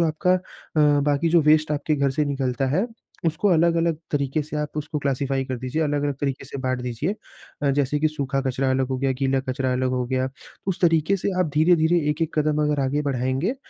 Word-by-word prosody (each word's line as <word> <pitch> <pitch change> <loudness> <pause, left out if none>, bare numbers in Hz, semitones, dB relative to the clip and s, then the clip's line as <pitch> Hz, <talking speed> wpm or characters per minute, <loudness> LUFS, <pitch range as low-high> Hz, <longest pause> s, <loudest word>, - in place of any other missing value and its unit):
जो 170 - +4
आपका 170 +4 +2
अ, - - +2 0.4
बाकी 145 +1 +3
जो 170 0 +5
वेस्ट 155 0 +4
आपके 150 +1 0
घर 140 -1 +2
से 150 +2 0
निकलता 135 -2 -1
है, 200 - +1 0.4
उसको 165 +6 +1
अलग-अलग 170 -1 +3
तरीके 140 +1 0
से 150 +1 -6
आप 150 0 -4
उसको 150 0 -3
क्लासिफाई 135 -1 -1
कर 130 -1 -4
दीजिए, 130 +6 -2
अलग-अलग 145 -1 0
तरीके 135 -2 -2
से 135 - -7
बाँट 130 -1 -1
दीजिए। 125 - -2 0.5
अ, 140 - +3
जैसे 145 +1 +1
कि 155 - +3
सूखा 140 -3 -2
कचरा 130 0 0
अलग 130 0 +1
हो 130 - -1
गया, 135 0 +1
गीला 135 0 0
कचरा 130 0 0
अलग 130 0 0
हो 125 -1 0
गया। 130 0 0 0.4
उस 185 - -1
तरीके 165 +2 +3
से 195 - -2
आप 170 - +2
धीरे-धीरे 165 +1 +4
एक-एक 160 +2 -1
कदम 150 0 +2
अगर 150 -1 +1
आगे 140 +3 0
बढ़ाएँगे, 135 - -1
145 Hz, 210 wpm, -23 LUFS, 135-155 Hz, 0.5 s, जो